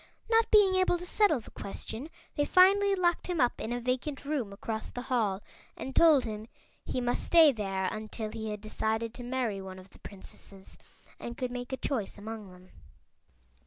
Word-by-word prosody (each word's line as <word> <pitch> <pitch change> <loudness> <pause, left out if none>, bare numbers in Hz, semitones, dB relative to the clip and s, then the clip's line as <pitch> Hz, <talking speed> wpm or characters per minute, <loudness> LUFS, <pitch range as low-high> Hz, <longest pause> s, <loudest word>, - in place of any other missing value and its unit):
Not 455 0 +4
being 410 -3 +6
able 370 -1 +3
to 350 - -7
settle 360 - +3
the - - -14
question 225 +7 -6 0.3
they 290 - +2
finally 390 +4 +5
locked 345 -2 +1
him 355 -3 -1
up 245 -2 +2
in 225 - -3
a 245 - -1
vacant 255 +4 -2
room 275 -8 -2
across 220 +2 -5
the 245 - -6
hall 215 -7 0 0.3
and 265 - -6
told 310 -6 +6
him 215 -1 -5 0.4
he - - -2
must 245 0 0
stay 325 -3 +7
there 195 -5 -2
until 215 +2 -4
he 220 -1 -5
had 210 -1 -5
decided 220 +1 -2
to 245 - -8
marry 240 -5 -2
one 190 -1 -8
of 185 +1 -14
the - - -18
Princesses 195 0 -11 0.4
and 235 0 -7
could 255 -2 -2
make 245 0 -5
a 265 - -2
choice 230 -10 -3
among 215 -1 -7
them. 180 0 -16
245 Hz, 190 wpm, -30 LUFS, 215-300 Hz, 0.4 s, stay